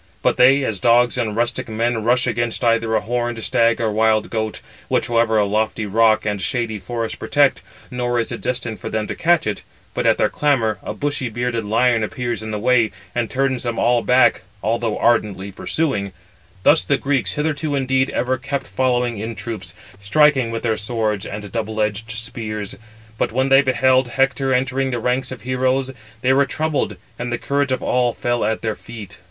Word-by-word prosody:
But -, -, +2 dB
they—as 130 Hz, -5 st, +4 dB
dogs 120 Hz, 0 st, +4 dB
and 115 Hz, -4 st, -1 dB
rustic 120 Hz, 0 st, -1 dB
men 115 Hz, 0 st, -1 dB
rush 125 Hz, +2 st, +2 dB
against 120 Hz, -1 st, -1 dB
either 115 Hz, -1 st, +2 dB
a 110 Hz, -, +2 dB
horned 120 Hz, 0 st, -2 dB
stag 115 Hz, +1 st, +2 dB
or 115 Hz, -2 st, 0 dB
wild 110 Hz, 0 st, +2 dB
goat; 110 Hz, -1 st, -2 dB, 0.3 s
which -, -, +1 dB
however 115 Hz, -1 st, +2 dB
a 105 Hz, -, +3 dB
lofty 110 Hz, +1 st, -1 dB
rock 110 Hz, +2 st, +3 dB
and 105 Hz, -2 st, -1 dB
shady 115 Hz, +1 st, -2 dB
forest 115 Hz, +4 st, -4 dB
protect, 145 Hz, -1 st, +2 dB, 0.3 s
nor 120 Hz, -1 st, -1 dB
is 115 Hz, -, -2 dB
it -, -, -5 dB
destined 120 Hz, -3 st, -3 dB
for -, -, -5 dB
them 110 Hz, -1 st, -2 dB
to -, -, -4 dB
catch 170 Hz, 0 st, +2 dB
it; 105 Hz, -1 st, -2 dB, 0.3 s
but -, -, 0 dB
at -, -, +4 dB
their -, -, +3 dB
clamour 120 Hz, -8 st, +1 dB
492 -, -, -8 dB
a -, -, -2 dB
bushy 145 Hz, -2 st, -2 dB
bearded 120 Hz, 0 st, -2 dB
lion 115 Hz, +2 st, +2 dB
appears 120 Hz, +1 st, -3 dB
in 110 Hz, -, -6 dB
the 105 Hz, -, -2 dB
way, 120 Hz, 0 st, +3 dB, 0.2 s
and 120 Hz, -2 st, -1 dB
turns 135 Hz, -2 st, 0 dB
them 120 Hz, -2 st, -3 dB
all 120 Hz, 0 st, +3 dB
back, 125 Hz, +1 st, +4 dB, 0.2 s
although 115 Hz, 0 st, 0 dB
ardently 105 Hz, -4 st, +1 dB
pursuing: 100 Hz, -, -2 dB, 0.5 s
thus 155 Hz, -, +5 dB
the 140 Hz, -, +1 dB
Greeks 140 Hz, -2 st, 0 dB
hitherto 150 Hz, 0 st, -1 dB
indeed 130 Hz, -1 st, +1 dB
ever 130 Hz, +1 st, -1 dB
kept 135 Hz, +1 st, -3 dB
following 120 Hz, +3 st, 0 dB
in 110 Hz, +2 st, -4 dB
troops, 100 Hz, -6 st, -6 dB, 0.2 s
striking 130 Hz, +4 st, +3 dB
with 115 Hz, 0 st, -4 dB
their 110 Hz, -2 st, +1 dB
swords 105 Hz, -2 st, -2 dB
and 105 Hz, -1 st, -7 dB
double 110 Hz, 0 st, -3 dB
edged 105 Hz, +1 st, -1 dB
spears. 110 Hz, -2 st, -4 dB, 0.4 s
But -, -, 0 dB
when 130 Hz, +3 st, +1 dB
they 135 Hz, +1 st, +7 dB
beheld 130 Hz, -1 st, +3 dB
Hector 135 Hz, +2 st, +1 dB
entering 130 Hz, +1 st, +1 dB
the 125 Hz, -, -2 dB
ranks 125 Hz, +2 st, -1 dB
of 120 Hz, -5 st, -8 dB
heroes, 130 Hz, +1 st, 0 dB, 0.3 s
they 130 Hz, +1 st, +3 dB
were 140 Hz, +1 st, +3 dB
troubled, 155 Hz, +2 st, -1 dB, 0.2 s
and 120 Hz, 0 st, -3 dB
the 120 Hz, -, 0 dB
courage 140 Hz, +1 st, -1 dB
of 130 Hz, -, -1 dB
all 125 Hz, -1 st, +1 dB
fell 120 Hz, +1 st, -1 dB
at 110 Hz, +1 st, -1 dB
their 110 Hz, -1 st, 0 dB
feet. 110 Hz, -3 st, -11 dB
120 Hz, 190 wpm, -20 LUFS, 110-130 Hz, 0.5 s, they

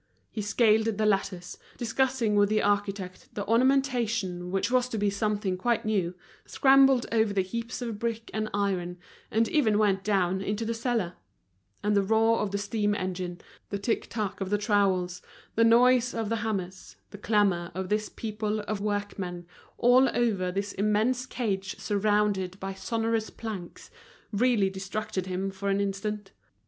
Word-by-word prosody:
He 215 Hz, -, -4 dB
scaled 220 Hz, +1 st, +3 dB
the 220 Hz, -1 st, 0 dB
ladders, 195 Hz, -3 st, -1 dB, 0.2 s
discussing 245 Hz, -2 st, 0 dB
with 205 Hz, 0 st, +4 dB
the 215 Hz, 0 st, +2 dB
architect 200 Hz, -2 st, -1 dB
the 205 Hz, -, -3 dB
ornamentation 230 Hz, -7 st, +1 dB
which 195 Hz, +5 st, -1 dB
was 250 Hz, 0 st, +2 dB
to 225 Hz, -, -3 dB
be 205 Hz, -1 st, +1 dB
something 205 Hz, -2 st, -1 dB
quite 235 Hz, +4 st, 0 dB
new, 190 Hz, -5 st, 0 dB, 0.3 s
scrambled 270 Hz, -2 st, +5 dB
over 220 Hz, -2 st, +2 dB
the 195 Hz, -2 st, +2 dB
heaps 230 Hz, +5 st, -5 dB
of 225 Hz, -3 st, -4 dB
brick 230 Hz, 0 st, -3 dB
and 215 Hz, 0 st, -2 dB
iron, 185 Hz, -3 st, -1 dB, 0.3 s
and 225 Hz, +1 st, +2 dB
even 225 Hz, -9 st, +2 dB
went 200 Hz, -2 st, +2 dB
down 190 Hz, -2 st, +1 dB
into 210 Hz, +3 st, -2 dB
the 230 Hz, -, -1 dB
cellar; 225 Hz, -6 st, -2 dB, 0.7 s
and 210 Hz, 0 st, +2 dB
the 200 Hz, -, +4 dB
roar 225 Hz, +3 st, +3 dB
of 210 Hz, -, -1 dB
the 200 Hz, -, -2 dB
steam 205 Hz, 0 st, 0 dB
engine, 180 Hz, -2 st, -4 dB, 0.3 s
the 200 Hz, -, -2 dB
tic 210 Hz, +3 st, -1 dB
tac 205 Hz, -3 st, -3 dB
of 190 Hz, -, -2 dB
the 205 Hz, -, +2 dB
trowels, 190 Hz, -4 st, +1 dB, 0.3 s
the 230 Hz, -, +3 dB
noise 245 Hz, +2 st, +5 dB
of 225 Hz, -2 st, -2 dB
the 230 Hz, -, 0 dB
hammers, 190 Hz, -4 st, -4 dB, 0.2 s
the 205 Hz, -, -10 dB
clamor 200 Hz, -6 st, +1 dB
of 190 Hz, 0 st, -4 dB
this 210 Hz, 0 st, 0 dB
people 215 Hz, -1 st, -3 dB
of 210 Hz, -1 st, -4 dB
workmen, 200 Hz, -4 st, -3 dB, 0.3 s
all 250 Hz, +2 st, +5 dB
over 200 Hz, -7 st, +1 dB
this 200 Hz, +2 st, -3 dB
immense 215 Hz, +5 st, +1 dB
cage 200 Hz, -7 st, -3 dB
surrounded 205 Hz, -2 st, 0 dB
by 195 Hz, 0 st, -4 dB
sonorous 225 Hz, +3 st, -1 dB
planks, 205 Hz, -6 st, -8 dB, 0.4 s
really 225 Hz, -2 st, +3 dB
distracted 190 Hz, 0 st, -4 dB
him 190 Hz, +1 st, -2 dB
for 195 Hz, +1 st, -4 dB
an 195 Hz, 0 st, +1 dB
instant. 200 Hz, 0 st, -3 dB
210 Hz, 160 wpm, -28 LUFS, 195-225 Hz, 0.7 s, scrambled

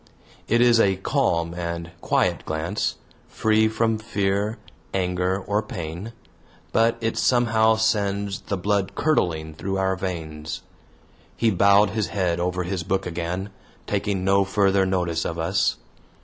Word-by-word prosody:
It 115 Hz, +2 st, +3 dB
is 120 Hz, -1 st, +5 dB
a 95 Hz, -3 st, +4 dB
calm 85 Hz, -2 st, 0 dB
and 85 Hz, -1 st, -4 dB
quiet -, -, +1 dB
glance, 80 Hz, +6 st, -2 dB, 0.3 s
free 110 Hz, 0 st, +2 dB
from 110 Hz, 0 st, 0 dB
fear, 100 Hz, 0 st, -1 dB, 0.4 s
anger, 90 Hz, 0 st, 0 dB
or 105 Hz, +2 st, -1 dB
pain; 90 Hz, 0 st, -6 dB, 0.6 s
but 115 Hz, +1 st, +3 dB
it 115 Hz, 0 st, -1 dB
somehow 110 Hz, -3 st, +3 dB
sends 100 Hz, -3 st, 0 dB
the 100 Hz, -, -3 dB
blood 100 Hz, +1 st, 0 dB
curdling 85 Hz, -, 0 dB
through 95 Hz, +5 st, -3 dB
our 95 Hz, 0 st, +1 dB
veins. 80 Hz, -5 st, -5 dB, 0.7 s
He 115 Hz, -1 st, +3 dB
bowed 100 Hz, +2 st, +5 dB
his 110 Hz, -2 st, -1 dB
head 90 Hz, -4 st, -1 dB
over 90 Hz, +1 st, -1 dB
his 90 Hz, 0 st, -3 dB
book 95 Hz, +3 st, -1 dB
again, 90 Hz, +3 st, -3 dB, 0.3 s
taking 100 Hz, -2 st, -1 dB
no 100 Hz, 0 st, +4 dB
further 95 Hz, -1 st, +2 dB
notice 85 Hz, -3 st, 0 dB
of 85 Hz, -, -3 dB
us. 90 Hz, +4 st, +1 dB
95 Hz, 135 wpm, -24 LUFS, 90-105 Hz, 0.7 s, is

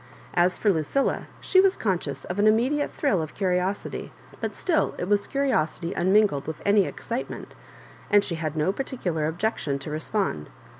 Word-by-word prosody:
As 180 Hz, +1 st, +3 dB
for 205 Hz, -3 st, +3 dB
Lucilla, 165 Hz, -, 0 dB
she 375 Hz, -, +5 dB
was 390 Hz, 0 st, +3 dB
conscious 190 Hz, -5 st, -2 dB
of 180 Hz, +3 st, -4 dB
an 210 Hz, -, +5 dB
immediate 255 Hz, +7 st, +2 dB
thrill 205 Hz, -, +1 dB
of 155 Hz, -, -6 dB
curi 185 Hz, -2 st, +1 dB
osity, 190 Hz, +3 st, -3 dB, 0.3 s
but -, -, -3 dB
still 335 Hz, -4 st, +1 dB
it 175 Hz, -, -3 dB
was 205 Hz, 0 st, +2 dB
curiosity 180 Hz, -, 0 dB
unmingled 190 Hz, -5 st, +3 dB
with 160 Hz, -, -4 dB
sny 200 Hz, -1 st, +4 dB
excitement, 235 Hz, +3 st, -5 dB, 0.6 s
and 205 Hz, -1 st, +5 dB
she 180 Hz, -, -3 dB
had 160 Hz, -2 st, -3 dB
no 155 Hz, +5 st, +2 dB
particular 180 Hz, -, -2 dB
objection. 160 Hz, -4 st, -1 dB
to 140 Hz, +2 st, -7 dB
respond. 155 Hz, -, -2 dB
190 Hz, 165 wpm, -25 LUFS, 160-220 Hz, 0.6 s, she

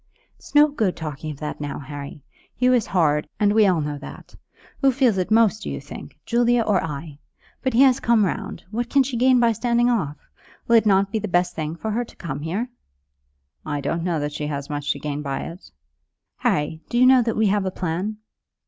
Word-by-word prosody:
"It's -, -, -17 dB
no 295 Hz, +1 st, +8 dB
good 225 Hz, -11 st, -1 dB
talking 155 Hz, -1 st, -5 dB
of 145 Hz, -2 st, -7 dB
that 150 Hz, 0 st, -5 dB
now, 145 Hz, -1 st, -4 dB
Harry. 140 Hz, 0 st, -8 dB, 0.3 s
Hugh 250 Hz, 0 st, +3 dB
is 240 Hz, -4 st, +2 dB
hard, 155 Hz, -5 st, +1 dB
and 205 Hz, -1 st, +3 dB
we 215 Hz, -1 st, +5 dB
all 175 Hz, -4 st, +2 dB
know 145 Hz, -1 st, -4 dB
that. -, -, -11 dB, 0.5 s
Who 270 Hz, -1 st, +5 dB
feels 245 Hz, -6 st, +2 dB
it 180 Hz, -, -1 dB
most, 220 Hz, -1 st, +3 dB
do -, -, -5 dB
you -, -, -4 dB
think; -, -, -11 dB
Julia 240 Hz, 0 st, +2 dB
or 205 Hz, -4 st, +1 dB
I? 150 Hz, -1 st, -6 dB, 0.4 s
But 260 Hz, -, -1 dB
as -, -, +2 dB
he 265 Hz, -, +8 dB
has 265 Hz, -1 st, +4 dB
come 230 Hz, -5 st, +3 dB
round, 175 Hz, -, -4 dB
what 240 Hz, +2 st, -2 dB
can 275 Hz, -1 st, +4 dB
she 260 Hz, -1 st, -4 dB
gain 255 Hz, +1 st, +4 dB
by 235 Hz, -1 st, +4 dB
standing 240 Hz, +2 st, +1 dB
off? 150 Hz, -11 st, -1 dB, 0.5 s
Will 235 Hz, -, +6 dB
it 220 Hz, -, +3 dB
not 195 Hz, 0 st, +3 dB
be 220 Hz, -, 0 dB
the 215 Hz, -, -4 dB
best 175 Hz, -1 st, +1 dB
thing 155 Hz, 0 st, -4 dB
for 220 Hz, +6 st, -4 dB
her 235 Hz, +3 st, 0 dB
to -, -, -15 dB
come 145 Hz, -5 st, -5 dB
here?" 195 Hz, +11 st, -3 dB, 0.9 s
"I 145 Hz, -1 st, -3 dB
don't 145 Hz, +4 st, -2 dB
know 170 Hz, -2 st, -1 dB
that 145 Hz, 0 st, -3 dB
she 150 Hz, 0 st, -3 dB
has 140 Hz, -1 st, -5 dB
much 145 Hz, 0 st, -2 dB
to -, -, -9 dB
gain 150 Hz, -1 st, -4 dB
by 140 Hz, -2 st, -3 dB
it." 170 Hz, +3 st, -9 dB, 0.7 s
"Harry, 150 Hz, +2 st, -1 dB
do 240 Hz, -, -1 dB
you 250 Hz, -, +6 dB
know 255 Hz, 0 st, +7 dB
that 230 Hz, -1 st, -1 dB
we 220 Hz, -, +3 dB
have 200 Hz, -1 st, +1 dB
a -, -, +1 dB
plan?" 185 Hz, +4 st, -3 dB
195 Hz, 230 wpm, -23 LUFS, 150-235 Hz, 0.9 s, no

